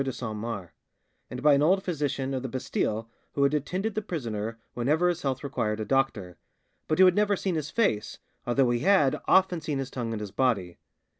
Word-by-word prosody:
de 135 - -2
Saint 115 -3 -5
Mars, 105 -5 -5 0.6
and 125 +1 -7
by 150 -1 +6
an 140 - +3
old 190 +6 +3
physician 140 -6 -2
of 130 - -2
the 130 - -4
Bastille 115 -3 -2 0.3
who 140 - +1
had 140 +1 +3
attended 185 +9 -1
the 215 - -1
prisoner 115 - -4 0.2
whenever 150 +9 +2
his 175 -1 -2
health 135 -1 -2
required 110 -6 -2
a 110 - -2
doctor, 110 -8 0 0.5
but 155 - +1
who 190 - +8
had 185 - +6
never 205 +1 +2
seen 190 -1 -2
his 155 -3 -2
face, 115 - 0 0.3
although 120 0 +3
he 120 - +1
had 155 -3 +3
"often 185 -3 +4
seen 150 -2 -2
his 135 -1 -4
tongue 120 -3 -3
and 110 - -3
his 105 -2 -6
body." 100 -10 0
135 Hz, 210 wpm, -27 LUFS, 115-160 Hz, 0.6 s, who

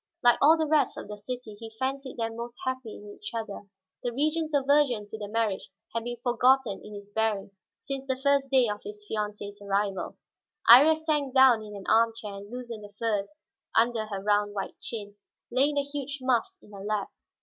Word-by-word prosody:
Like 240 -1 +5
all 315 +3 +7
the 320 - +1
rest 305 -1 +2
of - - -7
the 210 - -6
city, 220 +1 -7
he 225 -1 -9
fancied 265 +1 -3
them 225 -1 -2
most 235 +1 -7
happy 260 -4 -3
in 205 0 -10
each 205 +2 -6
other. 210 -3 -5 0.3
The 245 - -2
Regent's 310 +5 0
aversion 275 -6 +3
to 220 - -6
the 205 - -5
marriage 215 -2 -1 0.2
had 230 0 -2
been 240 0 -4
forgotten 250 -3 +3
in 210 - -9
his 200 0 -10
bearing 215 -2 0 0.3
since 275 -1 -6
the 260 - +1
first 280 0 +2
day 260 -2 +5
of 210 -1 -3
his 210 0 -9
fiancée's 205 -1 -4
arrival. 200 0 -1 0.5
Iría 280 +7 +9
sank 300 -4 -1
down 260 -4 +7
in 210 -1 -9
an 195 - -8
arm 230 0 +4
chair 215 -3 -7
and 200 +1 -9
loosened 240 -3 -7
the 205 0 -12
furs 215 +3 -1 0.4
under 225 -1 +2
her 200 -2 -4
round 205 0 +1
white 195 - -3
chin, 205 -3 -6 0.3
laying 275 +4 +3
the 285 - +3
huge 285 0 -4
muff 255 -3 +2 0.2
in - - -17
her 195 -1 -8
lap. 210 -1 -2
230 Hz, 200 wpm, -28 LUFS, 210-265 Hz, 0.5 s, Iría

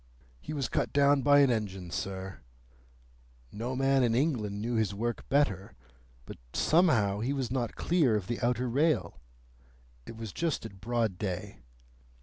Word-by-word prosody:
"He 70 - -8
was 140 -5 -2
cut - - -1
down 140 0 +4
by 145 +1 +6
an 135 -2 +4
engine, 95 -6 -3
sir. 95 0 -5 1.1
No 120 +4 -4
man 135 +1 +3
in 115 -2 +2
England 120 -8 0
knew 115 +3 -2
his 110 -3 0
work 120 +3 -3
better. 105 -9 +1 0.5
But - - -9 0.2
somehow 115 - +3
he 125 +6 -1
was 130 -4 -3
not 125 -3 -2
clear 160 -10 +2
of 105 -3 -2
the 120 +3 -4
outer 125 +1 0
rail. 150 +6 +1 0.9
It 115 - -9
was 110 -4 -7
just 165 -8 -2
at 100 -4 -10
broad 115 -5 -1
day. 100 0 -4
120 Hz, 155 wpm, -30 LUFS, 105-135 Hz, 1.1 s, by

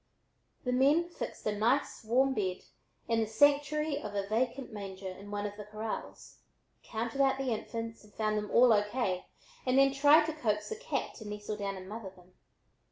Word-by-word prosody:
The 250 - -1
men 285 +7 +4
fixed 345 - -7
a 210 - 0
nice 235 +7 +1
warm 260 +5 +3
bed 190 -5 -2 0.4
in 230 -1 +2
the 220 - +1
sanctuary 290 +5 +3
of 210 -1 -6
a 200 -1 -1
vacant 240 +3 -1
manger 195 -2 -6
in 190 +2 -8
one 205 0 -3
of 205 0 -4
the 210 - -6
corrals, 215 +1 -6 0.4
counted 230 +4 -2
out 270 -1 +4
the 270 -2 -1
infants 230 +1 -5
and 210 - -18
found 215 0 -1
them 210 -1 -2
all 245 -1 +6
O. 205 - +5
K., 205 -4 -2 0.4
and 255 0 +2
then 275 0 +5
tried 290 +3 +6
to 320 - -2
coax 215 -8 -1
the 445 - -3
cat 440 - -3
to 220 - -9
nestle 210 0 -5
down 200 -1 -3
and 185 0 -9
mother 210 -1 -6
them. 180 -1 -20
225 Hz, 195 wpm, -31 LUFS, 205-270 Hz, 0.4 s, all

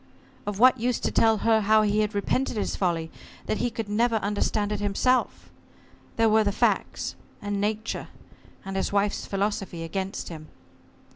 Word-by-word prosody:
Of 205 -1 -2
what 255 +2 +6
use 245 +1 0
to - - 0
tell 225 -1 +4
her 225 -1 +4
how 215 +1 +4
he 210 0 +1
had 210 0 0
repented 235 +4 0
his 205 - -1
folly, 165 -4 -1 0.3
that 215 - -1
he 245 - +1
could 225 -2 -5
never 230 +3 +1
understand 205 0 0
it 210 - -1
himself? 205 +5 0 0.6
There 225 0 +3
were 220 0 +4
the 205 - +1
facts, - - 0 0.3
and 205 -1 -3
Nature, 215 +2 -2 0.6
and 195 0 -5
his 195 - -1
wife's 200 0 0
philosophy 195 -4 -2
against 190 +3 -4
him. 155 -2 -9
210 Hz, 165 wpm, -26 LUFS, 200-220 Hz, 0.6 s, what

